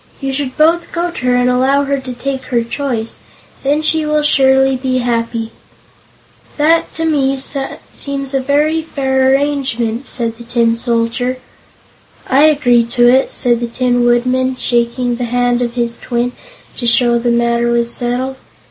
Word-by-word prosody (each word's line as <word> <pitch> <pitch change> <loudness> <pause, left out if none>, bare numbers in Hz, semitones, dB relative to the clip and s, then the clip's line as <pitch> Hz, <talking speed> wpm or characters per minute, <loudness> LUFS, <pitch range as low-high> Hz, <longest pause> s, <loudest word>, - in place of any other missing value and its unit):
"You 270 -1 -3
should 265 -2 -3
both 330 +3 +2
go 345 0 -2
to 260 - -7
her 250 - +3
and 245 0 +2
allow 260 +3 +2
her 280 0 -1
to 260 -1 -7
take 265 +1 -4
her 240 -2 0
choice. 235 -2 -4 0.4
Then 290 +3 0
she 315 0 +2
will 300 0 0
surely 265 -2 +3
be 255 0 -1
happy." 230 -2 -2 1.1
"That, 320 +3 +2
to 325 - -2
me, 275 -4 +1
seems 275 0 -3
a 270 - +2
very 295 +4 +1
fair 265 -4 0
arrangement," 270 -4 -1
said 230 -2 -3
the - - -8
Tin 235 -1 +1
Soldier. 235 +2 -1 0.9
"I 275 +3 +4
agree 255 -6 +3
to 240 +1 +2
it," 260 +2 +3
said 240 -3 +1
the 240 - -3
Tin 245 0 0
Woodman, 255 +2 +1
shaking 240 0 -1
the 245 - -2
hand 245 0 0
of 240 0 -2
his 235 -1 -2
twin 245 0 -2 0.5
to 240 - -2
show 235 0 +3
the 240 +1 -1
matter 235 0 +1
was 235 0 0
settled. 255 +2 -3
255 Hz, 165 wpm, -15 LUFS, 240-275 Hz, 1.1 s, I